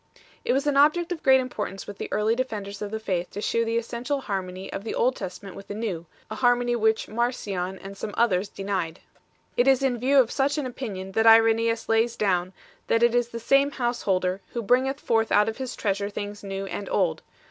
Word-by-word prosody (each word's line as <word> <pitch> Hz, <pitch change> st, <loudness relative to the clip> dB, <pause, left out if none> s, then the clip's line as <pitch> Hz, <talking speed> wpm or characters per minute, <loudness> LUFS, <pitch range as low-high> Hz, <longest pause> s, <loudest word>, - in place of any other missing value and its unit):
It -, -, 0 dB
was 275 Hz, +2 st, +1 dB
an 290 Hz, -2 st, +1 dB
object 320 Hz, +5 st, +4 dB
of 335 Hz, -3 st, -3 dB
great 265 Hz, 0 st, +6 dB
importance 210 Hz, -6 st, -4 dB
with 205 Hz, -, -9 dB
the -, -, -5 dB
early 215 Hz, +2 st, +2 dB
defenders 210 Hz, -5 st, -4 dB
of 205 Hz, -, -3 dB
the 220 Hz, +1 st, -4 dB
faith 180 Hz, -5 st, -2 dB
to 205 Hz, -, -7 dB
shew 230 Hz, +2 st, +1 dB
the 230 Hz, 0 st, 0 dB
essential 240 Hz, +4 st, -2 dB
harmony 190 Hz, -4 st, -5 dB
of 195 Hz, -, -5 dB
the 225 Hz, -, -4 dB
Old 255 Hz, +2 st, +2 dB
Testament 190 Hz, 0 st, -7 dB
with 195 Hz, -, -10 dB
the 205 Hz, -, -5 dB
New, 190 Hz, -7 st, -4 dB, 0.2 s
a -, -, -2 dB
harmony 245 Hz, -1 st, +3 dB
which 220 Hz, -1 st, +1 dB
Marcion 205 Hz, -6 st, -2 dB
and 195 Hz, +1 st, -9 dB
some 210 Hz, +2 st, -5 dB
others 200 Hz, -4 st, +2 dB
denied. 190 Hz, -5 st, -3 dB, 0.6 s
It 245 Hz, -, +3 dB
is 270 Hz, 0 st, +4 dB
in 250 Hz, -3 st, +1 dB
view 270 Hz, +4 st, +3 dB
of 245 Hz, -3 st, +3 dB
such 280 Hz, +2 st, +1 dB
an 295 Hz, -, -1 dB
opinion 205 Hz, -7 st, -5 dB
that 225 Hz, +3 st, +2 dB
Irenaeus 225 Hz, 0 st, +5 dB
5 -, -, -21 dB
lays 225 Hz, +1 st, +2 dB
down, 185 Hz, -3 st, 0 dB, 0.4 s
that 230 Hz, +1 st, +2 dB
it 235 Hz, 0 st, +4 dB
is 245 Hz, -1 st, +2 dB
the 230 Hz, -, -6 dB
same 275 Hz, +4 st, +3 dB
Householder 200 Hz, -8 st, -1 dB
who 235 Hz, -, -3 dB
bringeth 260 Hz, +5 st, +2 dB
forth 225 Hz, -4 st, +1 dB
out 210 Hz, +1 st, +4 dB
of 225 Hz, -, -3 dB
his 260 Hz, -2 st, -5 dB
treasure 200 Hz, -1 st, -1 dB
things 205 Hz, 0 st, -6 dB
new 195 Hz, 0 st, -4 dB
and 195 Hz, 0 st, -5 dB
old. 165 Hz, -5 st, +1 dB
225 Hz, 220 wpm, -25 LUFS, 195-245 Hz, 0.6 s, great